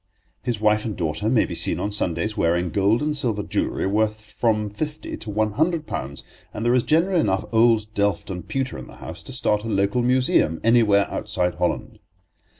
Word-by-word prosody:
His 120 -4 -2
wife 105 0 +2
and 110 -3 -4
daughter 85 +5 -1
may 115 -2 +3
be - - -6
seen - - +1
on 105 - -2
Sundays 105 +2 -1
wearing 85 +1 +1
gold 105 +6 +2
and 150 0 0
silver 115 -8 -1
jewellery - - -1
worth 110 +1 -1
from 110 -1 +1
fifty 150 +7 -5
to 110 - -9
one 110 +1 0
hundred 160 - 0
pounds, 70 - -5 0.3
and 110 - -3
there 120 - +3
is 125 - +4
generally 170 +7 +2
enough 95 -11 +1
old 115 -1 +4
delft 100 -3 0
and 90 -1 -6
pewter 135 -1 -2
in - - -9
the - - -13
house - - -8
to - - -9
start 105 -5 0
a - - -5
local 100 +2 +1
museum 125 -10 +2
anywhere 110 -4 +4
outside 90 -4 -1
Holland. - - -2
110 Hz, 195 wpm, -23 LUFS, 100-120 Hz, 0.3 s, is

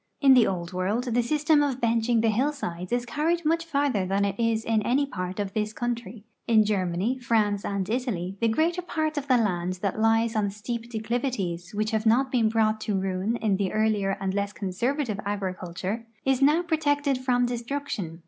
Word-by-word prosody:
In 275 -2 +7
the 250 -3 +6
Old 175 -2 -3
W'orld 210 +7 -1
the 245 - +3
system 300 +4 +2
of 275 -3 0
benching 230 0 +2
the 225 - +3
hillsides 215 -8 -2
is 245 0 0
carried 325 +6 -1
much 330 +2 +2
farther 280 - 0
than 195 +2 +1
it 200 - 0
is 230 -1 +1
in 225 -1 +2
any 260 +6 +2
part 185 -6 -5
of 200 -1 -3
this 215 0 -1
country. 235 -2 -4 0.2
In 220 -2 +5
Germany, 200 +4 0
France, 215 -4 +1
and 200 -2 -2
Italy 215 -6 -2
the 230 - +3
greater 325 +10 +1 0.2
}>art 310 0 +1
of 285 -1 -3
the 255 -2 +4
land 185 -5 0
that 200 +1 -1
lies 225 +1 +2
on 210 -2 +1
steep 225 +3 -5
declivities 220 -6 -3
which 215 +2 0
have 220 0 0
not 255 +4 +3
been 230 -4 +3
brought 215 -1 +1
to 210 -3 -1
ruin 190 +4 -1
in 210 -4 0
the 195 -2 -1
earlier 210 -3 +1
and 190 -1 -2
less 200 +1 -2
conservative 225 +4 -2
agriculture 195 +2 -4 0.2
is 270 0 +2
now 300 +5 +4
protected 290 -4 +1
from 250 -1 +2
destruction. 240 - -4
225 Hz, 190 wpm, -26 LUFS, 200-255 Hz, 0.2 s, In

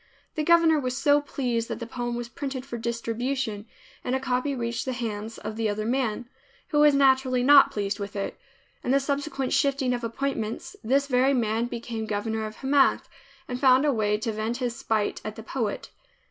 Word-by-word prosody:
The 310 - -2
governor 330 -1 +5
was 255 -2 -2
so 290 +1 +4
pleased 245 -5 -2
that - - -4
the 235 - -5
poem 240 +1 -4
was 240 0 -4
printed 270 -2 -5
for 270 - -6
distribution 230 -1 -3 0.4
and 250 - -1
a - - 0
copy 260 +2 -1
reached 235 -1 -3
the 260 - -2
hands 225 -2 -4
of 215 +1 -6
the 225 -1 0
other 210 +1 -2
man, 240 -2 -1 0.4
who 295 - +2
was 295 -1 +6
naturally 265 -2 +3
not 280 +1 +8
pleased 200 -1 -2
with 200 0 -6
it. 200 - -3 0.5
In - - -3
the 275 +2 +4
subsequent 275 -1 -2
shifting 275 -2 +2
of 240 -1 -3
appointments 230 -2 -3
this 275 +5 +2
very 265 0 +3
man 230 0 0
became 230 -2 -5
governor 220 +1 -2
of 215 - -9
Hamath, 275 +1 +2 0.4
and 250 0 -4
found 260 +1 +5
a 290 - +3
way 210 -2 +1
to 220 +1 -2
vent 220 +2 -2
his 245 -2 -2
spite 215 -2 -1
at 215 - -5
the 220 - -9
poet. 225 -3 -3
245 Hz, 195 wpm, -26 LUFS, 225-270 Hz, 0.5 s, not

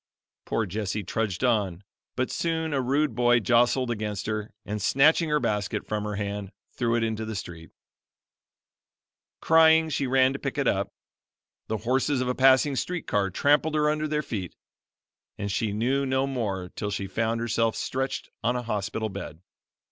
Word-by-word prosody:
Poor 115 - 0
Jessie 105 +1 -3
trudged 100 +1 -2
on, 105 -7 +1 0.3
but 130 0 -1
soon 160 -2 -1
a 135 - +1
rude 140 +2 +1
boy 120 +1 +4
jostled 120 +2 +2
against 105 -3 -3
her, 110 0 -3
and 105 0 -4
snatching 155 - +4
her 150 0 +2
basket 105 -6 -1
from 105 -1 -2
her 105 -1 -3
hand, 100 -1 -4 0.2
threw 120 -2 0
it 120 - +1
into 110 -1 -2
the 110 0 -5
street. 85 -4 -7 1.7
Crying, 160 0 +5
she 140 -2 -1
ran 130 +1 +4
to 140 - -5
pick 140 +1 -4
it 140 -3 +1
up. 100 0 0 0.8
The 110 - -1
horses 130 +5 0
of 130 - -1
a 125 - +1
passing 135 +2 +4
street 175 +6 -3
car 100 -2 +1
trampled 145 - +2
her 150 0 +3
under 155 0 -1
their 150 0 -1
feet 95 -9 -5 0.8
and 100 0 -3
she 105 +1 0
knew 125 +7 0
no 130 +1 +1
more 105 -9 -3
till 105 - -4
she 100 -1 -3
found 110 +4 -1
herself 115 -1 0
stretched 135 +1 -3
on 125 +2 +1
a 125 - -2
hospital 110 0 -2
bed. 90 -5 -8
115 Hz, 170 wpm, -26 LUFS, 105-135 Hz, 1.7 s, Crying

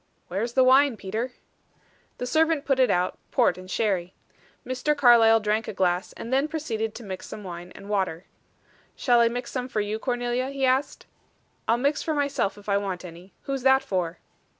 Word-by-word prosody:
"Where 190 +3 -2
is 235 +1 -3
the 260 - +5
wine, 260 -1 +5
Peter?" 220 +6 -4 0.8
The 250 - -3
servant 315 +2 +2
put 270 -2 +1
it 255 - +4
out, 180 +1 0
port - - +3
and 185 0 -11
sherry. 185 -4 -1 0.5
Mr. 260 +4 -1
Carlyle 230 -4 +6
drank 215 +1 -1
a - - -4
glass, 180 -1 0
and 235 - -6
then 275 +3 +3
proceeded 225 -9 -3
to 235 - -8
mix 190 -3 -7
some 210 - -8
wine 175 -1 -8
and 200 - -11
water. 190 -4 -1 0.7
"Shall 245 -2 +3
I 235 - +5
mix 245 +2 -4
some 255 -1 -3
for 215 - -1
you, 210 +1 -2
Cornelia?" 245 +1 -1
he 275 -1 -1
asked. 265 +2 0 0.6
"I'll 230 - +3
mix 280 +4 0
for 315 - -2
myself 280 -9 0
if 205 - -15
I 200 -1 +2
want 190 -3 -4
any. 175 +2 -12
Who's 275 -1 -3
that 265 +1 +4
for?" 180 -3 -2
230 Hz, 195 wpm, -25 LUFS, 195-260 Hz, 0.8 s, Carlyle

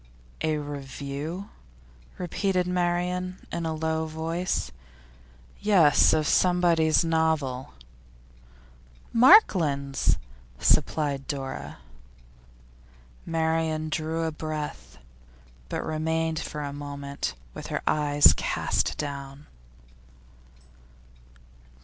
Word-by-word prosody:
'A 155 -1 +1
review?' 145 +5 -6 0.7
repeated 180 +1 0
Marian 180 +1 -1
in 170 -1 -2
a 160 - -2
low 160 0 -1
voice. 160 - -2 0.9
'Yes; 180 -9 +5
of 155 -1 +1
somebody's 170 -3 +3
novel.' 160 - 0 1.4
'Markland's,' 170 - +5 0.4
supplied 140 - +1
Dora. 135 -2 -5 1.5
Marian 160 -1 0
drew 160 +1 -2
a 160 - -1
breath, 150 - -6 0.7
but - - -3
remained 160 +1 -1
for 150 -2 -5
a 140 -1 -5
moment 140 - -5 0.2
with - - -8
her - - -3
eyes 145 -1 +5
cast - - -1
down. 140 0 -6
160 Hz, 80 wpm, -26 LUFS, 145-165 Hz, 1.5 s, Yes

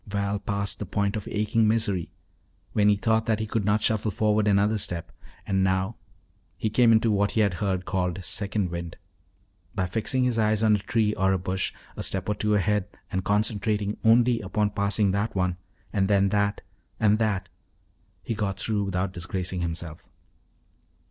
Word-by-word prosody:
Val 100 0 -1
passed 100 -1 -3
the 105 - -3
point 100 +2 0
of 105 - -5
aching 110 +1 +1
misery 105 -6 +1 0.6
when 105 0 +4
he 105 - +5
thought 110 +2 +1
that 110 -1 +1
he 110 - -1
could 110 0 -1
not 105 +1 +1
shuffle 110 0 +1
forward 105 0 +1
another 105 +1 +3
step 85 -3 -3 0.3
and 95 -1 +1
now 95 +3 0 0.6
he 110 +3 -1
came 115 +1 +5
into 110 0 +4
what 100 0 +1
he - - +5
had 100 -3 +2
heard 95 -3 -1
called 95 -1 -1
"second 100 -3 -1
wind." 85 -1 -5 0.8
By 95 - 0
fixing 110 +8 0
his 125 -2 +1
eyes 110 0 +2
on 110 -1 +5
a - - -1
tree 105 +1 +1
or 95 -2 +2
a - - +2
bush 95 +1 -2 0.2
a - - -5
step 95 -1 -2
or 105 - +1
two 105 +1 +1
ahead 105 0 +1 0.2
and 95 0 -1
concentrating 105 0 0
only 115 +1 +4
upon 105 +2 0
passing 100 0 +1
that 100 +3 -1
one, 90 -1 0 0.4
and 95 -2 +2
then 100 -1 +3
that, 100 0 0 0.4
and 110 -1 +3
that, 105 -4 0 0.7
he - - -2
got 100 -3 -2
through 105 -2 0
without 95 0 -2
disgracing 90 0 -3
himself. 85 -1 -4
100 Hz, 180 wpm, -26 LUFS, 95-110 Hz, 0.8 s, he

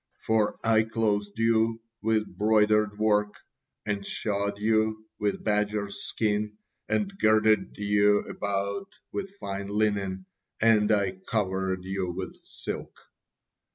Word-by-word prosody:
For 110 -2 +2
'I 110 -1 +4
clothed 105 -2 -1
you 115 0 +2 0.2
with 110 0 +2
broidered 105 -1 +3
work, 105 -1 +2 0.5
and 105 -2 -2
shod 100 0 -2
you 110 +1 +1
with 105 -1 -1
badgers' 105 -1 0
skins, 105 -1 0 0.4
and 200 -2 0
girded 110 0 +3
you 105 0 +3
about 100 - -3 0.2
with 195 0 -5
fine 100 - -4
linen, 100 -2 0 0.3
and 110 -2 +4
I 100 -3 +2 0.2
covered 95 -3 -1
you 95 -1 -2
with - - -5
silk. - - -7
105 Hz, 115 wpm, -27 LUFS, 100-110 Hz, 0.5 s, I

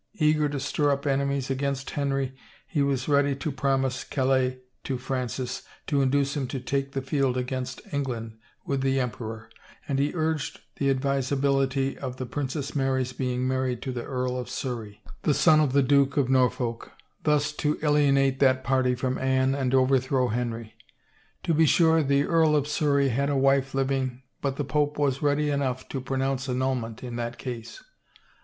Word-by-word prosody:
Eager 155 -4 +2
to 145 -1 -3
stir 145 +2 0
up 140 +1 0
enemies 140 -1 0
against 135 0 -2
Henry 135 -2 -1 0.3
he 145 +1 -1
was 135 -2 0
ready 145 -1 +3
to 140 +3 -3
promise 135 -1 0
Calais 130 -1 +1 0.3
to 130 - -2
Francis 125 -1 -3 0.2
to 140 -1 +1
induce 140 +1 +1
him 135 -3 -1
to 135 - -4
take 135 +2 -2
the 135 - -2
field 135 -2 0
against 125 0 -3
Eng 140 -1 0
land 115 -3 -5 0.3
with 140 -1 -1
the 135 0 +1
emperor, 115 -2 -4 0.4
and 135 -2 0
he 145 +1 +1
urged 155 -2 -1 0.2
the 140 - +1
advisability 135 0 +1
of 130 -2 -5
the 130 - -4
Princess 140 +3 -4
Mary's 130 -2 0
being 125 0 -1
married 130 -2 0
to 130 - -3
the 125 -1 -4
Earl 125 -1 -2
of 125 - -6
Surrey, 115 -6 -5 0.2
the 150 - +2
son 155 -3 +5
of 150 -4 +2
the 140 +1 +4
Duke 140 0 +3
of 135 -2 +2
Norfolk, 125 -2 +1 0.3
thus 150 -1 +2
to 150 0 -1
alienate 140 -3 +3
that 130 -1 +3
party 130 -1 +2
from 130 +1 -2
Anne 130 0 +2
and 135 -2 0
overthrow 130 -1 +2
Henry. 115 -1 -3 0.7
To 165 - +1
be 160 0 +4
sure 160 +1 +5
the 140 -1 +2
Earl 160 -1 +3
of 145 -1 +1
Surrey 140 -2 +2
had 140 +4 0
a 140 - +1
wife 135 0 +2
living 130 -1 -1 0.2
but 135 -1 -1
the 145 - -2
pope 150 +1 0
was 140 -2 +1
ready 145 0 +2
enough 130 -2 -1
to 135 - -3
pronounce 135 0 -1
annulment 125 -3 -2
in 120 -1 -5
that 120 0 -4
case. 120 -4 -7
135 Hz, 175 wpm, -26 LUFS, 130-140 Hz, 0.7 s, son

